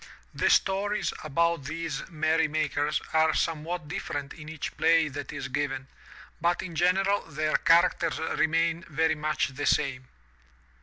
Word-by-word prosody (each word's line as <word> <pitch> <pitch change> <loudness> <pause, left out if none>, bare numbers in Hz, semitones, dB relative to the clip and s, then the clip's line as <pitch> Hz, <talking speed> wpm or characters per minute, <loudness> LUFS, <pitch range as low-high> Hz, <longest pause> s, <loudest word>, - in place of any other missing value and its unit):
The - - +1
stories 205 +2 +1
about 170 0 0
these 160 +2 -4
merry 160 0 +1
makers 150 -1 0
are 160 0 +3
somewhat 165 0 -2
different 145 -5 -4
in 155 -1 -10
each 160 -2 -5
play 165 -1 +3
that 145 0 -6
is 145 -1 -5
given, 135 0 -2 0.5
but 175 +1 +1
in 180 -3 -7
general 190 +4 +2
their 155 0 -1
characters 165 -1 +3
remain 165 +1 0
very 160 0 +2
much 155 -1 -1
the 135 +2 -4
same. 130 -3 +1
160 Hz, 140 wpm, -27 LUFS, 150-170 Hz, 0.5 s, are